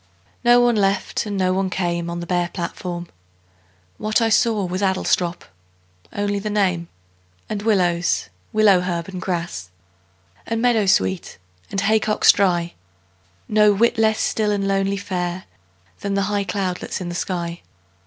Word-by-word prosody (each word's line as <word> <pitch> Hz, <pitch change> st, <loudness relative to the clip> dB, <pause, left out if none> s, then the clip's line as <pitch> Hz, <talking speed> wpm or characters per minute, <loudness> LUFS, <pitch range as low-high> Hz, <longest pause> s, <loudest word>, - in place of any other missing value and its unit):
No 240 Hz, 0 st, +6 dB
one 240 Hz, -1 st, +3 dB
left 195 Hz, +1 st, 0 dB
and 205 Hz, -1 st, -3 dB
no 185 Hz, -1 st, +2 dB
one 190 Hz, 0 st, 0 dB
came 170 Hz, -2 st, -2 dB
On 170 Hz, 0 st, -4 dB
the -, -, -5 dB
bare 175 Hz, 0 st, 0 dB
platform. 175 Hz, 0 st, -5 dB, 0.9 s
What 215 Hz, +2 st, +1 dB
I 225 Hz, -1 st, +2 dB
saw 220 Hz, -2 st, +2 dB
Was 180 Hz, +2 st, -3 dB
Adlestrop 185 Hz, -2 st, 0 dB, 0.7 s
only 205 Hz, 0 st, -1 dB
the 210 Hz, +2 st, -4 dB
name 185 Hz, -5 st, 0 dB, 0.6 s
And 210 Hz, -1 st, -3 dB
willows, 180 Hz, -5 st, +1 dB, 0.2 s
willow 210 Hz, -4 st, +5 dB
herb, 175 Hz, -1 st, -3 dB
and 185 Hz, -2 st, -6 dB
grass, 170 Hz, -, -3 dB, 0.8 s
And 230 Hz, 0 st, -1 dB
meadowsweet, 200 Hz, -, +1 dB, 0.3 s
and 195 Hz, -, -1 dB
haycocks 215 Hz, +1 st, +4 dB
dry; 175 Hz, -3 st, +1 dB, 0.7 s
No 210 Hz, -1 st, +4 dB
whit 230 Hz, +2 st, +2 dB
less 220 Hz, -1 st, +3 dB
still 215 Hz, -1 st, 0 dB
and 200 Hz, -1 st, 0 dB
lonely 195 Hz, 0 st, +1 dB
fair 185 Hz, -2 st, -3 dB, 0.6 s
Than 200 Hz, 0 st, -2 dB
the 200 Hz, -, +1 dB
high 200 Hz, -1 st, 0 dB
cloudlets 190 Hz, -3 st, -3 dB
in 180 Hz, -2 st, -5 dB
the -, -, -4 dB
sky. 170 Hz, -1 st, -3 dB
195 Hz, 145 wpm, -21 LUFS, 175-210 Hz, 0.9 s, No